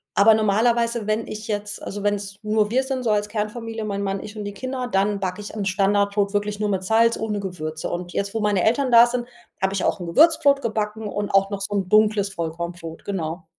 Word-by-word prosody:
aber 220 +2 +7
normalerweise, 230 +1 +1
wenn 215 +1 -1
ich 215 0 -7
jetzt 205 -1 -4
also 205 0 -6
wenn's 205 -1 -1
nur 215 0 +1
wir 260 +3 +2
sind 265 -1 -3
so 225 - +1
als 210 0 0
Kernfamilie, 220 +1 -4
mein 200 -1 -3
Mann, 195 0 -2
ich 215 - -9
und 210 - -4
die 205 0 -5
Kinder, 255 +3 -4
dann 200 +1 +1
backe 185 +1 -3
ich 205 - -8
'n 210 - -2
Standardbrot 200 +1 +1
wirklich 205 0 -1
nur 210 - 0
mit 190 -2 -1
Salz, 225 +4 +3
ohne 215 -2 -2
Gewürze. 160 -5 -5
Und 175 0 -4
jetzt, 200 +2 -2
wo 225 - -1
meine 205 -3 +1
Eltern 255 +3 +2
da 235 0 +9
sind, 240 0 -3 0.3
habe 190 0 +1
ich 195 - -1
auch - - 0
'n 175 - -5
Gewürzbrot 285 - +4
gebacken 215 -1 -2
und 205 0 -3
auch 195 0 +3
noch 200 - -4
so 200 +1 -3
'n 195 -2 -1
dunkles 210 -1 +3
Vollkornbrot, 170 -1 -5
genau. 170 -3 -4
205 Hz, 225 wpm, -23 LUFS, 195-220 Hz, 0.3 s, da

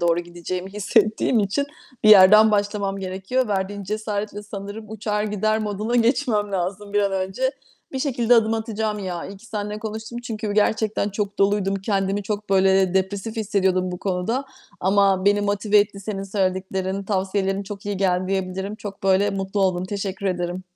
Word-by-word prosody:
doğru 170 0 +2
gideceğimi 175 +2 -6
hissettiğim 215 +2 +2
için 220 +9 0 0.4
bir - - +7
yerden 215 +2 +8
başlamam 205 -1 0
gerekiyor. 195 +6 -2
Verdiğin 200 0 -2
cesaretle 210 0 -3
sanırım 205 +1 -8
uçar 210 -1 -2
gider 215 +1 0
moduna 215 +3 -2
geçmem 230 -4 +1
lazım 195 +3 -3
bir 205 - +3
an 200 -1 0
önce. 190 +7 -1 0.4
Bir 265 - -2
şekilde 245 -4 +2
adım 225 -1 +3
atacağım 220 -1 -2
ya. 180 -3 -4
İyi 195 - -9
ki 225 +4 -16
seninle 210 -1 -4
konuştum. 220 +2 -6
Çünkü 220 -3 -4
gerçekten 215 0 +1
çok 205 0 -3
doluydum. 195 0 +2
Kendimi 195 0 -1
çok 210 0 -4
böyle, 190 0 +4
eee, 185 0 -1
depresif 200 +4 -1
hissediyordum 190 -4 +1
bu 180 - -5
konuda. 195 +8 -1 0.4
Ama 195 0 +3
beni 205 0 +4
motive 205 +1 +2
etti 205 -1 0
senin 195 -1 -4
söylediklerin, 190 0 -1
tavsiyelerin 195 0 -1
çok 200 0 -8
iyi 205 -1 -2
geldi 185 -1 +1
diyebilirim. 190 +1 -2
Çok 205 -1 -8
böyle 195 +1 +3
mutlu 195 +1 -2
oldum. 185 -1 +1
Teşekkür 195 0 -4
ederim. 180 0 -2
200 Hz, 165 wpm, -23 LUFS, 190-215 Hz, 0.4 s, yerden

